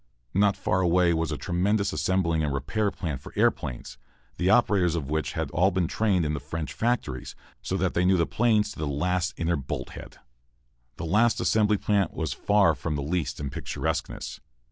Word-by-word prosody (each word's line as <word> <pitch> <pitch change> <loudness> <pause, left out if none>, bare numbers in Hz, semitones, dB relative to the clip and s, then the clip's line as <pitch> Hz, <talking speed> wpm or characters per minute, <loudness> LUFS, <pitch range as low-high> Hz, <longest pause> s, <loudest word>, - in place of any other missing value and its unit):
Not 100 0 +3
far 95 - 0
away 90 -1 +3
was 80 -1 -1
a 75 - -2
tremendous 100 +5 0
assembling 85 -4 +1
and 75 - 0
repair 100 +11 0
plant 75 -10 -5
for - - -11
airplanes, - - -1 0.4
the 90 - +2
operators 100 -6 +3
of 75 -4 -4
which 80 0 -1
had - - -3
all 90 +4 +3
been 90 -2 0
trained 95 -3 +1
in 75 - -1
the 75 - -2
French 75 +2 -5
factories, 110 - -2 0.3
so 95 - -2
that 95 -1 0
they 85 - +1
knew 95 +1 +4
the 85 - +2
planes 105 -1 +2
to - - -11
the 80 - -2
last 90 +5 -1
inner 85 0 0
bolthead. 70 -1 -6 0.8
The - - -4
last 110 +8 +3
assembly 105 -1 +3
plant 100 -1 0
was 80 -5 -2
far 100 -5 +3
from 75 0 -3
least 75 0 -2
in 70 -2 -4
picturesqueness. - - -4
90 Hz, 185 wpm, -26 LUFS, 75-100 Hz, 0.8 s, knew